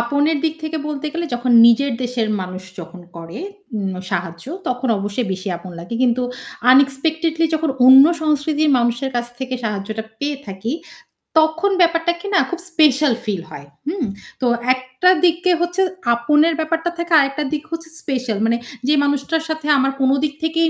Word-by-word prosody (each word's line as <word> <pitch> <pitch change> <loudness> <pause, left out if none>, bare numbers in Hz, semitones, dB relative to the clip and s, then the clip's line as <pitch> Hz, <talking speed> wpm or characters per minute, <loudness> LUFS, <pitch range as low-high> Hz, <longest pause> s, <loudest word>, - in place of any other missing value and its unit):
আপনের 290 +6 +1
দিক 320 -1 +1
থেকে 315 0 -3
বলতে 300 0 -4
গেলে 335 +1 -3
যখন 245 +1 -1 0.2
নিজের 265 +4 +4
দেশের 240 -3 -1
মানুষ 185 0 -6 0.2
যখন 175 +1 -9 0.2
করে 165 +4 -8 0.4
উ - - -2 0.3
সাহায্য 170 -1 -4 0.2
তখন 250 +1 -2
অবশ্যই 205 +4 -3
বেশি 190 +2 -5
আপন 175 +2 -10
লাগে। 175 +7 -7
কিন্তু 250 0 +2 0.5
আনএক্সপেক্টেডলি 310 +5 +2
যখন 315 -1 0 0.2
অন্য 265 +1 +10 0.2
সংস্কৃতির 305 0 +1
মানুষের 240 +3 0
কাছ 240 0 -1
থেকে 260 -1 -4
সাহায্যটা 215 0 -4 0.2
পেয়ে 290 0 -2
থাকি, 195 +4 -5 0.7
তখন 320 +5 +3
ব্যাপারটাকে 340 +1 +1
না - - +6
খুব 355 - -4
স্পেশাল 300 -4 +4
ফিল 200 -5 -2
হয়। 140 - -10 0.2
হুম? 325 -3 -1 0.4
তো 255 - +2 0.3
একটা 255 +7 0 0.2
দিকে 350 +2 +2
হচ্ছে 350 +2 0 0.3
আপনের 295 +7 +3
ব্যাপারটা 325 +2 -1
থেকে 340 0 -4
আরেকটা 275 +1 0
দিক 300 0 -2
হচ্ছে 330 -1 -6
স্পেশাল। 255 -6 -2
মানে 230 +1 +2 0.3
যে 295 - +4
মানুষটার 285 +3 0
সাথে 315 -1 -3
আমার 270 0 +2
কোনো 265 0 +4
দিক 300 -1 0
থেকেই 325 +1 +2
275 Hz, 160 wpm, -19 LUFS, 235-320 Hz, 0.7 s, অন্য